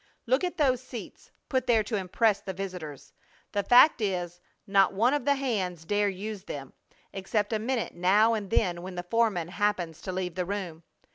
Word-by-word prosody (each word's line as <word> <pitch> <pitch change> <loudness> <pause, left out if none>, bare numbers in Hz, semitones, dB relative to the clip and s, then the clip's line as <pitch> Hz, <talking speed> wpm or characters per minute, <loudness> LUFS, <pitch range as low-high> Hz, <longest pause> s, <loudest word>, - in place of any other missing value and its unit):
Look 260 +6 +2
at 360 - -2
those 260 -5 +2
seats, 250 -3 -10 0.2
put 260 -2 -1
there 225 -3 +4
to 215 +2 -3
impress 205 +2 +1
the 190 - -5
visitors! 165 -7 -7 0.4
The 205 - 0
fact 245 +7 +6
is 180 -3 -2 0.2
not 195 -1 +3
one 235 +7 +3
of 290 -4 -1
the 285 0 +3
hands 190 - -2
dare 205 +2 +1
use 200 +1 -6
them, 140 -2 -7 0.4
except 205 +3 -1
a 220 - +1
minute 235 +1 -2
now 200 +6 +4
and 210 -3 -3
then 180 -6 +1
when 185 +1 -7
the 175 - -4
foreman 195 -4 0
happens 185 -5 -1
to 190 - -4
leave 180 -1 -3
the 180 +1 -2
room! 185 -5 -4
200 Hz, 190 wpm, -28 LUFS, 180-230 Hz, 0.4 s, fact